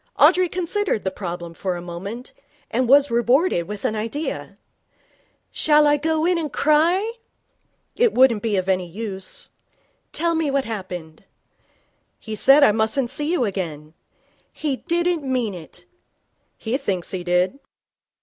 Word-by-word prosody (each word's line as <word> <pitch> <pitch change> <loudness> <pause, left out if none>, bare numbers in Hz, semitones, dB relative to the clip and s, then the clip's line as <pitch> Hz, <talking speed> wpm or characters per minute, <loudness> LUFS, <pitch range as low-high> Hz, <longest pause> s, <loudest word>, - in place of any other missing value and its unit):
Audrey 365 -1 +5
considered 365 - -1
the 190 - -1
problem 175 -3 -6
for 185 +1 -3
a - - -5
moment, 190 +8 -7 0.4
and 255 -2 0
was 280 0 +5
rewarded 240 - +2
with 205 0 -6
an 220 - 0
idea. 230 +9 -4 0.9
'Shall 300 -1 +4
I 295 0 +4
go 315 +1 0
in 355 -1 +2
and 305 -4 -4
cry?' 345 - +2 0.8
'It 480 -2 +3
wouldn't 250 -4 +4
be 215 -3 0
of 185 0 -1
any 185 -2 +1
use.' 195 +1 -6 0.6
'Tell 335 +1 0
me 320 -2 0
what 275 -1 0
happened.' 180 -7 -7 0.9
'He 220 -1 -7
said 275 +7 +6
I 245 - +7
mustn't 225 +4 0
see 295 +3 -1
you 345 -9 +1
again.' 160 -7 -5 0.6
'He 290 -4 -2
didn't 345 0 0
mean 250 -6 -1
it.' 175 0 -10 0.7
'He 235 +3 -2
thinks 185 -9 -3
he 185 -2 -4
did.' 180 +8 +1
235 Hz, 145 wpm, -22 LUFS, 190-300 Hz, 0.9 s, I